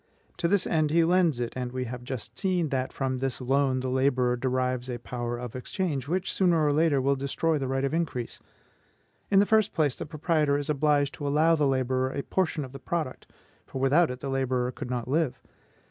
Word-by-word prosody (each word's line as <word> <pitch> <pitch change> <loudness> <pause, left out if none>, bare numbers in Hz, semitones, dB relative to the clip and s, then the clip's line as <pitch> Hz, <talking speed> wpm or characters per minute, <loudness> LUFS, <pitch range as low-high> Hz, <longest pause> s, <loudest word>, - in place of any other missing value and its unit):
To 170 - +1
this 200 +1 +2
end 155 -2 +1
he 165 +2 +4
lends 170 -5 +3
it; 120 -1 -3
and 125 -1 -3
we 130 0 -3
have 125 0 -6
just 125 -3 -6
seen 180 -5 0
that 130 -2 -1
from 130 -1 -2
this 135 -1 -2
loan 130 0 +1
the 130 - -3
laborer 130 -2 +2
derives 130 0 -1
a 120 - -3
power 120 0 -4
of 125 -1 -7
exchange, 140 0 -3
which 180 +4 -1
sooner 170 -5 +3
or 145 - +3
later 155 -2 +3
will 140 +1 +2
destroy 145 +3 0
the 135 - -2
right 135 +1 -1
of 140 - -2
increase. 160 -8 -2 0.9
In 195 - +3
the 200 - +6
first 220 -1 +3
place, 150 -5 +2
the - - -6
proprietor 155 -2 +1
is 145 +1 -1
obliged 145 -1 +2
to 145 - -5
allow 155 +3 +4
the 150 -3 +2
laborer 130 -1 +1
a 140 +1 -4
portion 160 -6 -1
of 130 - -12
the 135 - -9
product, 155 0 -4 0.4
for 130 - -6
without 145 +6 +4
it 125 0 -6
the 140 - -4
laborer 130 -2 0
could 125 - -7
not 120 -2 -3
live. 145 0 0
135 Hz, 215 wpm, -27 LUFS, 130-160 Hz, 0.9 s, the